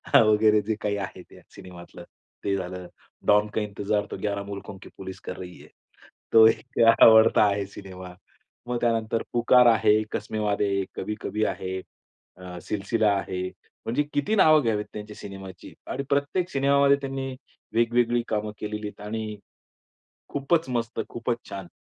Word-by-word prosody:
वगैरे 110 -1 +5
जे 110 - 0
काही 105 -1 -1
आहे 90 - -11
ते - - -16
सिनेमातलं 90 -1 -12 0.4
ते 100 -1 0
झालं. 90 -1 -6 0.4
डॉन 105 +1 +4
का 110 - +1
इंतजार 105 0 -2
तो - - -4
11 100 -1 -2
मुल्कों, 100 -1 -8
की 95 - -13
पुलिस 95 -1 -8
कर 90 - -5
रही 90 -1 -9
है. - - -14 0.6
तो 110 -1 +8
एक 125 +3 -2 0.2
आवडता 110 -1 +7
आहे 100 -1 +1
सिनेमा. 95 -2 -10 0.5
मग 125 -1 -2
त्यानंतर 115 -1 0
पुकार 120 +1 +5
आहे, 110 -1 +4
कसमे 110 0 -3
वादे, 105 -1 0 0.2
कभी 105 - -4
कभी 110 +1 -1
आहे, 95 0 -5 0.6
अ, 90 -1 -9
सिलसिला 105 +1 0
आहे. 95 -1 -4 0.4
म्हणजे 120 +6 0
किती 145 +10 0
नावं 155 -6 +6
घ्यावेत 105 -3 0
त्यांच्या 105 0 -8
सिनेमाची 95 -3 -10 0.2
आणि 140 - -3
प्रत्येक 145 +6 0
सिनेमामध्ये 140 0 +3
त्यांनी 135 -1 -4 0.4
वेगवेगळी 120 +1 +2
कामं 105 0 -1
केलेली 105 0 -4
आहेत 105 - -11
आणि 110 -1 -4 0.9
खूपच 150 +3 0
मस्त 115 -2 -2
खूपच 120 0 -2
छान. 95 -3 -7
105 Hz, 150 wpm, -25 LUFS, 100-120 Hz, 0.9 s, तो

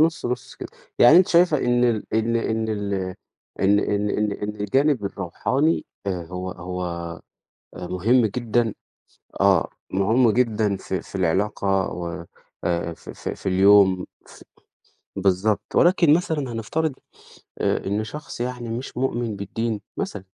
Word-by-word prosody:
نُص 165 +1 +2
نُص 125 +1 -4
كده، - - -8 0.3
يعني 135 +7 +8
أنتِ 180 +1 +6
شايفة 170 -3 +4
إن 120 -1 +2
ال 115 -3 +1
إن 115 +1 +1
إن 110 -1 -1
ال 105 -2 -2 0.7
إن 100 +1 +4
إن 105 0 0
إن 105 -1 0
إن 105 +1 -4
الجانِب 135 +3 +2
الروحاني 115 - 0 0.2
آآ، 90 -3 -2
هو 90 +2 -5
هو 85 -1 -5 0.6
مُهم 105 +8 +2
جدًا 115 0 0 0.7
آه، 95 -3 +4 0.2
مُهم 110 +5 +3
جدًا 110 -3 +1
في 95 -1 -4
في - - -16
العلاقة 95 +1 +1
و 85 0 -5 0.4
آآ، 85 -1 -1
في - - -11
في - - -5
في - - -13
اليوم 95 -1 +5 0.2
ف - - -15 0.7
بالضبط 95 +2 +1
ولكن 175 -3 +5
مثلًا 155 -6 -1
هنفترض 150 +8 -1 0.7
آآ، - - 0
إن 105 +3 -1
شخص 150 +2 -8
يعني 125 -1 -3
مش 120 +3 -5
مؤمن 120 -4 -1
بالدين 105 +2 -3 0.2
مثلًا 100 -2 -4
105 Hz, 140 wpm, -23 LUFS, 95-120 Hz, 0.7 s, يعني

